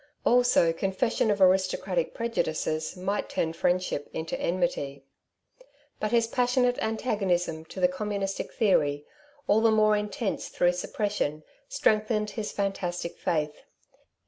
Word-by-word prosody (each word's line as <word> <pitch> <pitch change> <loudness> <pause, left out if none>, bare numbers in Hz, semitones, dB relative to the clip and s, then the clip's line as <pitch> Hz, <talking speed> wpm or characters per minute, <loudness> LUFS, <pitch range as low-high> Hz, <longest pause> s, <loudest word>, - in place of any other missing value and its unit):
Also 245 -9 +4
confession 195 +6 0
of 205 -1 +1
aristocratic 185 -2 +2
prejudices 160 -8 -2
might 195 +3 -2
turn 160 0 -1
friendship 175 -3 0
into 160 0 -3
enmity. 170 -6 -1 1.0
But 215 - -1
his 235 -1 +4
passionate 245 +1 +1
antagonism 195 -8 -1
to 185 - -9
the 180 - +5
communistic 195 +1 -3
theory, 145 -9 +2 0.4
all 215 +2 +3
the 225 - +5
more 215 -1 +4
intense 210 +1 -2
through 175 0 +2
suppression, 180 -5 -2 0.3
strengthened 215 - +1
his 220 -3 -4
fantastic 180 -4 -3
faith. 150 -2 -1
195 Hz, 120 wpm, -27 LUFS, 170-215 Hz, 1.0 s, the